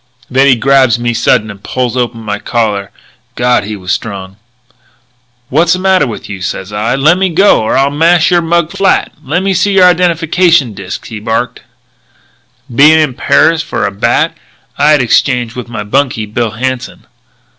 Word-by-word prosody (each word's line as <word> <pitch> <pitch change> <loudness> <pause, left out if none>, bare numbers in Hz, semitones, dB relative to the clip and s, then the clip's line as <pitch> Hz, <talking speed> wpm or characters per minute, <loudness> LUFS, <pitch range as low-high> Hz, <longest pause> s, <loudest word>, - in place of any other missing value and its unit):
"Then 135 +2 +3
he 130 - +5
grabs 130 -1 +3
me 120 0 -2
sudden 110 -2 +1
and 100 -1 -13
pulls 125 -2 -2
open 120 -2 -2
my 105 -2 -4
collar. 105 -5 -2 0.5
God, 120 -3 +1
he 105 +1 -5
was 95 -2 -5
strong. 95 -1 -5 1.1
"'What's 165 +4 +2
the - - -1
matter 190 -4 +2
with 115 - -7
you?' 100 -2 -8
says 95 +2 -5
I. 110 +4 -1
'Lemme 170 +7 +2
go 195 - +4
or 110 - 0
I'll 135 +1 +2
mash 165 +3 +2
your 175 -1 +3
mug 170 0 0
flat.' 195 0 0
'Lemme 180 +8 -1
see 195 +3 +1
your 190 -1 +5
identification 170 - +2
disc,' 95 -1 -7
he 110 -2 -7
barks. 115 +2 -3 1.1
"Bein' 150 +6 +5
in 155 -4 +1
Paris 160 +5 +2
for 165 - -3
a - - -2
bat, 100 - 0 0.4
I 150 - +2
had 150 -4 +4
exchanged 120 0 0
with 125 -1 -7
my 115 -3 -5
bunkie, 125 0 -1
Bill 110 +2 -2
Hanson. 125 +3 -5
130 Hz, 170 wpm, -11 LUFS, 110-165 Hz, 1.1 s, he